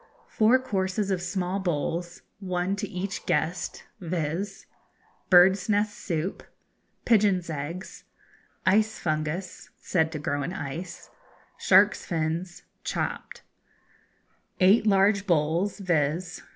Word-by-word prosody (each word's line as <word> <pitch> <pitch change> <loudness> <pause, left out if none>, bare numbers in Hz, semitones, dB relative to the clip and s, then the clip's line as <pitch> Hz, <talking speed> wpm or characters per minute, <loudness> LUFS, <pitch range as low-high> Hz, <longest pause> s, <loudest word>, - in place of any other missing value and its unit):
4 225 +4 +4
courses 200 -5 -2
of 185 -2 0
small 180 +1 -2
bowls, 175 0 -3 0.2
one 185 0 -1
to 200 - -4
each 185 +1 -4
guest, 160 +4 -1 0.2
viz. 175 +2 -3 0.6
Bird's 185 +3 +6
nest 210 0 +1
Soup 170 +1 -3 0.6
Pigeon's 200 -7 +3
Eggs 160 +6 -6 0.6
Ice 215 +3 +3
Fungus 155 +3 -3
(said 160 -3 0
to 160 - -4
grow 145 -1 -2
in 165 +6 -3
ice) 170 +3 -7 0.5
Shark's 195 +2 +4
Fins 170 +2 -3 0.2
(chopped) - - -4 1.2
8 205 +4 +5
large 200 0 +3
bowls, 170 +4 +1
viz. 175 -2 -1
180 Hz, 105 wpm, -26 LUFS, 165-195 Hz, 1.2 s, Bird's